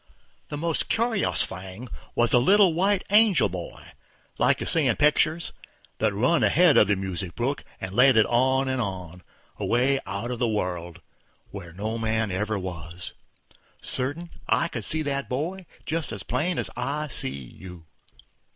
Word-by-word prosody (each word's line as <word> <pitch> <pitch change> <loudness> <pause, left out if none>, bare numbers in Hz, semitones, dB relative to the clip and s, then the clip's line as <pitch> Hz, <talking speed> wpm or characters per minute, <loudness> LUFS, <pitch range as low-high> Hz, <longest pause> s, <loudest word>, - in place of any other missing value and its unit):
The 145 - -4
most 165 +1 0
curious 230 -3 +3
thing 95 +6 -8 0.3
was 120 0 +2
the 125 - +5
little 195 +4 +5
white 190 +3 +1
angel 210 -3 +5
boy, 90 0 -8 0.5
like - - +3
you - - -3
see 160 -4 +2
in 120 - +2
pictures, 155 +3 +2 0.5
that 110 -1 +2
run 125 +12 +2
ahead 175 -3 +5
of - - +6
the 105 - +3
music 95 -2 -5
brook 130 +4 -2 0.2
and 95 0 -6
led 125 +2 +5
it 110 - +6
on, 130 +2 +2
and 130 -1 0
on, 90 -4 -5 0.4
away 130 +3 +2
out 100 +5 -4
of 120 - -4
the 120 - +2
world, 90 -5 -3 0.5
where 90 -4 -8
no 110 +6 -4
man 110 -2 0
ever 105 +3 -1
was, 85 -2 -6 0.7
certain, 145 +7 -4 0.2
I 170 - +2
could 120 -7 -5
see 160 0 -1
the 140 -1 -1
boy 170 +8 -3 0.2
just 160 0 -2
as 100 -4 -6
plain 155 - -1
as - - -1
I 150 +2 -2
see 115 - -3
you. 80 +6 -10
120 Hz, 165 wpm, -25 LUFS, 95-155 Hz, 0.7 s, of